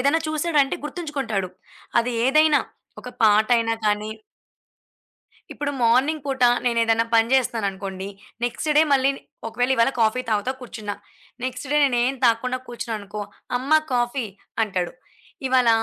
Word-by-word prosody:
ఏదైనా 285 +5 +2
చూసాడంటే 305 -3 +1
గుర్తుంచుకుంటాడు. 275 - -3 0.5
అది 245 +1 -2 0.2
ఏదైనా, 305 +1 +5 0.4
ఒక 250 - -8 0.2
పాటయినా 225 +2 +4
కానీ 210 +1 0 1.4
ఇప్పుడు 290 -1 -3
మార్నింగ్ 265 +6 +3
పూట 265 -2 +1 0.2
నేనేదన్నా 230 -1 +2
పని 225 0 +4
జే‌స్తన్నానుకోండి, 195 -6 -1 0.4
నెక్స్‌ట్ 245 +6 -1
డే - - +8
మళ్ళీ 270 0 +4 0.4
ఒకవేళ 245 +3 -1
ఇవాళ 230 +3 +4
కాఫీ 225 +3 +2
తాగుతా 215 +5 0
కూర్చున్న, 215 -4 -6 0.5
నెక్స్‌ట్ 255 +1 -4
డే 295 - +3
నేనేం 250 0 +1
తాగకుండా 250 +2 +2
కూర్చున్నాననుకో, 215 -3 -5 0.4
"అమ్మ! 265 +4 -6 0.2
కాఫీ" 240 0 0 0.4
అంటాడు. 180 -4 -3 0.6
ఇవాళ 255 -2 +4
240 Hz, 120 wpm, -23 LUFS, 220-270 Hz, 1.4 s, డే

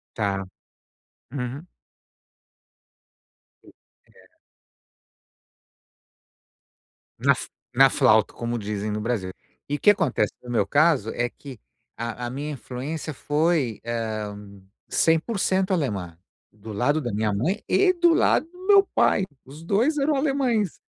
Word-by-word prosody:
Tá. 100 -3 -1 0.9
Uhum. 135 +4 -5 2.0
Sim, - - -17 0.5
é. - - -24 2.9
Na - - +4
f - - -7 0.3
na 135 +2 +7
flauta, 110 -6 +3
como 120 0 -3
dizem 105 0 -3
no 105 0 -2
Brasil. 105 -5 -2 0.4
E 145 - 0
o - - -14
que 205 - +6
acontece 160 - +1
no 125 - -9
meu 110 -5 +1
caso 145 -5 +3
é 120 0 0
que 135 -4 -11 0.4
a 115 +1 -4
a - - -4
minha 145 +4 -4
influência 145 +4 -5
foi, 150 - 0
hã, 105 -3 -5 0.3
100% 190 +3 +1
alemã, 100 - -2 0.3
do 110 +1 -10
lado 140 +9 +1
da 120 -6 -4
minha 105 0 0
mãe 165 - -1
e 385 -2 +4
do 345 -1 +4
lado 320 - +3
do 360 +2 -14
meu 400 -1 +6
pai, 195 - +3 0.2
os 145 +4 -12
2 225 - +1
eram 290 +2 +2
alemães. 265 - 0
135 Hz, 125 wpm, -24 LUFS, -, 2.9 s, na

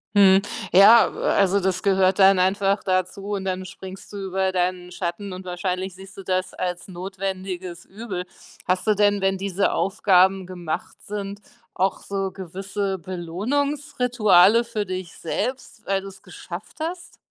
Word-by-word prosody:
Mhm, 195 -1 +7 0.3
ja, 210 +5 +8
äh, - - -5 0.3
also, 195 0 +3
das 185 -1 -1
gehört 190 -1 +3
dann 195 -1 +6
einfach 195 +2 +2
dazu 185 +2 -1
und 195 -1 -3
dann 185 0 -2
springst 190 0 -10
du 205 - -7
über 190 -1 -1
deinen 180 -1 -1
Schatten 180 +2 -4
und 185 +1 -8
wahrscheinlich 185 +1 -3
siehst 190 +2 -13
du 195 - -8
das 185 0 -1
als 180 -1 -3
notwendiges 185 -1 -5
Übel. 195 -3 -6 0.4
Hast 185 +3 0
du 215 - +4
denn, 205 0 +3
wenn 195 0 +1
diese 195 0 0
Aufgaben 190 -1 +3
gemacht 175 -4 -5
sind, 200 0 -5 0.3
auch 190 +1 0
so 195 -1 -3
gewisse 195 +2 -4
Belohnungsrituale 225 - +2
für 230 -3 -3
dich 185 -2 -5
selbst, 250 +4 -4
weil 195 0 0
du's 195 0 -11
geschafft 180 +1 -9
hast? 340 +2 -5
190 Hz, 150 wpm, -23 LUFS, 185-200 Hz, 0.4 s, ja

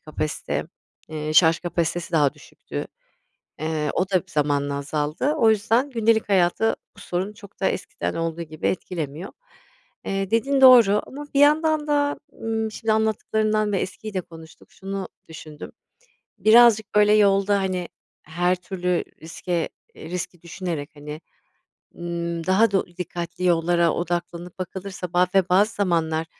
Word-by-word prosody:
kapasite, 155 0 -3 0.4
eee, 155 -1 -4
şarj 160 0 +6
kapasitesi, 175 0 -2
daha 145 -4 +3
düşüktü. - - -8 0.7
Eee, 155 -1 -1
o 185 +1 0
da 185 -2 +2
zamanla 145 -3 0
azaldı. 150 - -1
O 225 - +5
yüzden 230 +5 +2
gündelik 225 -3 +1
hayatı 195 +3 +2 0.2
bu - - -15
sorun 190 +2 -3
çok 200 -1 -15
da 195 - +1
eskiden - - -4
olduğu 165 0 -3
gibi 155 -1 -4
etkilemiyor. 165 -1 -4 0.7
Eee, 195 0 -2
dediğin 270 +4 +2
doğru 235 -6 +8
ama 290 +2 -8
bir - - +4
yandan 305 +1 +3
da, 290 0 +1 0.2
ımm, 220 -1 -2
şimdi 220 0 -2
anlattıklarından 215 -1 0
ve 195 - +1
eskiyi 210 +3 -5
de 185 - -1
konuştuk, 160 -1 -15
şunu 195 -1 -6 0.2
düşündüm: 155 -2 -10 0.7
Birazcık, 220 0 +5
böyle, 210 0 +5
yolda, 200 -1 +4
hani, 185 -2 -2 0.4
her 175 +3 0
türlü 180 -1 -2 0.2
riske 165 +1 -3 0.3
eee, 160 - -10
riski 180 -1 -5
düşünerek, 170 -4 -5
hani, 150 +2 -8 0.8
ımm, 170 -1 -4
daha 195 +4 +4
do 195 - +1
dikkatli 175 0 -6
yollara 170 0 +3
odaklanıp 175 +1 -4
bakılırsa, 185 -1 -6
ba 180 +1 +4
ve 190 -1 +3
bazı 205 +4 +3
zamanlar 165 -4 0
180 Hz, 140 wpm, -23 LUFS, 165-210 Hz, 0.8 s, doğru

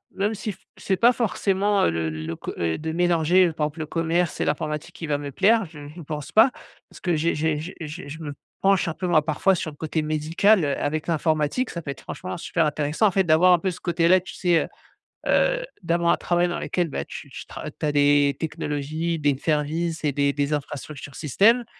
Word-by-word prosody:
même 205 +3 0
si 215 +1 -4
f 190 - -14 0.2
c'est 190 - -1
pas 235 +4 +6
forcément, 205 -3 +1
heu, - - +3
le 80 -1 -1
le 80 +1 -5
co - - -6
heu, 85 -1 0
de 160 +1 -4
mélanger, 175 +1 +3
heu, 165 - -3
par 155 -1 -1
exemple 150 +2 -6
le 155 - -2
commerce 165 +1 0
et - - +1
l'informatique 150 +3 -2
qui 170 -4 -6
va 145 -1 +1
me 145 -1 -6
plaire, 220 - +3
je 155 -3 -12
ne 150 +4 -10
pense 150 -1 -6
pas, 220 +4 +6 0.4
parce - - -14
que 175 -2 +1
j'ai 165 +2 +1
j'ai 155 0 0
j'ai 165 +4 -7
j'ai 155 +1 -7
je 160 +3 -8
me 145 -2 -5 0.3
penche 195 -2 +3
un 165 - -1
peu 180 - -4
moi, 160 -3 +4
parfois, 165 +5 +2
sur 160 -2 -4
le - - -15
côté 160 0 -2
médical, 160 +6 +2
heu, 140 - -1
avec 155 +1 -2
l'informatique. 160 - 0
Ça 170 - -5
peut 155 - -8
être, 140 - -10
franchement, 185 - -6
super 165 -1 0
intéressant, 150 +7 +1
en - - +1
fait, 190 +1 +2
d'avoir 175 +2 +5
un 175 - +4
peu 190 +2 -1
ce 170 - -9
côté 170 -1 +1
là, 185 +2 +6
tu 175 - -10
sais, 175 -3 +2
heu - - -10 0.6
heu, - - +2 0.2
d'avoir 170 0 +2
un - - +4
travail 175 0 +1
dans 175 - -3
lequel, 175 -2 -1
bah, 145 - -4
tu 145 - -9
tu - - -9
tra 155 - -7
tu 155 - -5
as 150 - +1
des 145 -1 +3
technologies, 155 +1 -2
des 145 -2 +1
services 160 +3 -1
et 145 - +1
des 140 0 +2
des 145 +1 -1
infrastructures 145 0 -6
systèmes. 215 - +3
160 Hz, 235 wpm, -24 LUFS, 150-180 Hz, 0.6 s, pas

